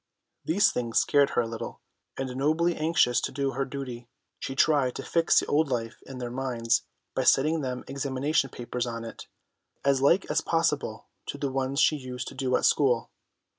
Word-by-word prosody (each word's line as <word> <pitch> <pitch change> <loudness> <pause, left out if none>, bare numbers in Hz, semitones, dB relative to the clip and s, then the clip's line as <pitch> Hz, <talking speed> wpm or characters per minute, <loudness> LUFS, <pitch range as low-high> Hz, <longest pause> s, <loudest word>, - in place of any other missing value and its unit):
These 200 +6 +3
things 120 -2 -2
scared 145 -1 +4
her 120 - +4
a - - -4
little, 115 0 -6 0.4
and 130 -1 -4
nobly 160 +5 +1
anxious 155 -6 +2
to - - -2
do 135 0 -1
her 135 0 -2
duty, 125 -3 -7 0.3
she 135 - -5
tried 140 -3 +3
to - - -5
fix 165 -1 +3
the - - -2
old 155 +1 +2
life 115 -3 -3
in 135 - -8
their 120 -1 -5
minds 120 -3 0 0.3
by 130 - 0
setting 155 +5 +3
them 125 -2 -4
examination 140 +1 0
papers 120 0 -4
on 115 -1 -5
it, 115 - -9 0.6
as 140 -1 +3
like 170 +8 +4
as 155 - +2
possible 165 0 0 0.2
to - - -4
the 140 - -2
ones 135 +1 -1
she 155 - +4
used 125 -2 -6
to - - -12
do 130 -1 0
at - - +1
school. 125 -6 +2
135 Hz, 190 wpm, -27 LUFS, 125-145 Hz, 0.6 s, scared